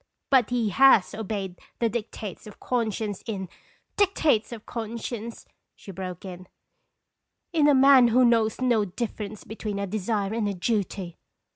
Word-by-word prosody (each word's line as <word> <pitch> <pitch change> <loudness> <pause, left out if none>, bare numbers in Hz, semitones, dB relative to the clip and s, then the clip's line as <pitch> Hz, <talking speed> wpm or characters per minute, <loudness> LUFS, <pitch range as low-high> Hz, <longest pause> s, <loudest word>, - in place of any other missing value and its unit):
"But 255 -5 +4
he 240 -3 0
has 215 -1 +5
obeyed 200 -4 -4 0.2
the 235 - +1
dictates 215 -4 -6
of 210 - -13
con 235 -3 -1
science 205 -1 -4
in 195 -4 -4 0.3
" - - -40
"Dictates 315 - +2
of 225 -2 -8
conscience!" 230 0 -6 0.3
she 195 - -11
broke 185 0 -7
in, 185 -1 -9 0.5
" - - -56
in 305 -3 +4
a 290 - +5
man 265 -2 +7
who 250 +2 +4
knows 230 -1 +2
no 240 -4 +3
difference 210 +1 -5
between 215 -2 -5
a 200 - -2
desire 205 +1 -2
and 220 -2 0
a 200 - -3
duty!" 190 -2 -2
220 Hz, 160 wpm, -26 LUFS, 200-240 Hz, 0.5 s, man